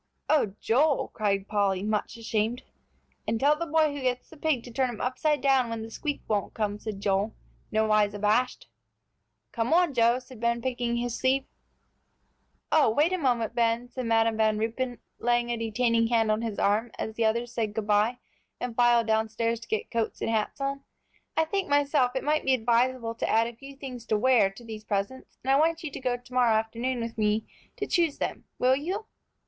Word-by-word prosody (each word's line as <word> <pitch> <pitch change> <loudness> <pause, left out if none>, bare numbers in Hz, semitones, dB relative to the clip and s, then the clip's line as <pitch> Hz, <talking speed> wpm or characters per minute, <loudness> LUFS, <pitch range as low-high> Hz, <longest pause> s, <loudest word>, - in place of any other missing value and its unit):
"Oh, 220 -11 +2
Joel!" 280 +5 +2
cried 200 -2 -1
Polly, 200 -2 +1
much 210 +2 -2
ashamed. 225 +1 -1 0.6
"And 225 +1 0
tell 290 +4 +4
the 335 +2 -4
boy 310 -1 +2
who 285 - -5
gets 250 -1 -2
the - - -12
pig 295 -5 0
to 245 - -10
turn 260 +2 +1
him 235 - -7
upside 285 +3 0
down 265 -3 +3
when 230 -1 -4
the 225 - -9
squeak 290 +4 -4
won't 205 -2 -1
come," 210 -1 -2
said 210 -3 -6
Joel, 200 +2 0 0.4
nowise 215 -1 +2
abashed. 215 +5 +1 0.8
"Come 230 +3 -1
on, 345 -3 +4
Joe," 235 0 +4
said 255 -2 -12
Ben, 235 +1 +1
picking 240 -1 -1
his 240 0 -2
sleeve. 265 +2 +1 1.3
"Oh, 310 -6 +5
wait 300 +10 +2
a - - +1
moment, 240 -6 +1
Ben," 235 0 +1
said 255 -1 -5
Madam 225 -1 +2
Van 215 -1 +2
Ruypen, 235 +3 -2 0.2
laying 240 0 +1
a 235 - -1
detaining 230 +1 +1
hand 225 -2 +2
on 215 +1 0
his 225 -3 -3
arm, 215 +4 +1
as 220 - -4
the 225 0 0
others 235 +2 0
said 220 -3 -2
good 220 - -2
by 210 +4 +2 0.4
and 245 -2 -4
filed 240 -1 +4
downstairs 220 +1 0
to 230 - -12
get 220 - -2
coats 230 -1 -1
and - - -1
hats 220 +3 -1
on. 275 0 -2 0.6
"I 320 - +4
think, 390 +2 -2
myself, 285 -3 +2
it 260 - -1
might 305 +1 +1
be 265 - +3
advisable 240 0 +1
to 230 - -3
add 225 +1 +4
a 235 0 -6
few 275 +3 -11
things 250 -4 -8
to 215 - +2
wear 225 -3 +4
to 195 +5 -14
these 220 -1 -8
presents, 205 +5 -3
and 265 - +1
I 275 - +5
want 325 +1 +2
you 305 - -4
to - - -6
go 250 -2 -1
to 245 +1 -17
morrow 245 -3 +4
afternoon 235 +3 -1
with 230 -1 -5
me 215 +1 +1 0.3
to - - -2
choose 335 -4 +1
them. - - -4
Will 255 +1 +4
you?" 370 +10 -3
235 Hz, 205 wpm, -27 LUFS, 220-260 Hz, 1.3 s, Oh